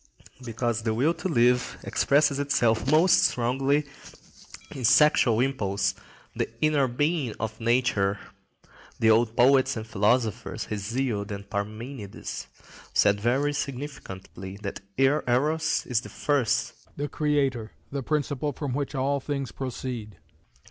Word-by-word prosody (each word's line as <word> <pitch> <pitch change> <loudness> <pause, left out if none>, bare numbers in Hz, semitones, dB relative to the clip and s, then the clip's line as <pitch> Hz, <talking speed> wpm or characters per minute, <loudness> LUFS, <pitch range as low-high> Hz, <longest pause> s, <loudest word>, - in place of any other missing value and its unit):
Because 120 -1 -2
the 110 -1 -1
will 145 +8 +2
to 165 +2 -4
live 125 -5 +2
expresses 140 0 +2
itself 120 -4 +1
most 160 +5 +5
strongly 135 +4 +1 0.9
in - - -8
the - - -5
sexual 120 -3 +5
impulse, 100 -7 0 0.4
the - - -1
inner 150 -3 +2
being 145 0 -1
of 110 -1 -4
nature, 115 -4 +1 0.8
the 110 0 +5
old 115 +1 +2
poets 130 +1 +4
and 110 - -5
philosophers—Hesiod 110 0 -1
and 100 0 -6
Parmenides—said 105 -1 -3
very 135 +7 +1
significantly 125 -10 -6
that 100 - -4 0.2
Eros 145 +3 +1
is 120 -3 0
the - - -10
first, 140 -6 0 0.2
the 145 +1 -2
creator, 140 -8 0 0.2
the 140 -1 -3
principle 145 0 -1
from 140 -1 -4
which 145 +2 -3
all 140 +2 0
things 140 -2 -4
proceed. 125 -4 -6
125 Hz, 120 wpm, -26 LUFS, 110-140 Hz, 0.9 s, most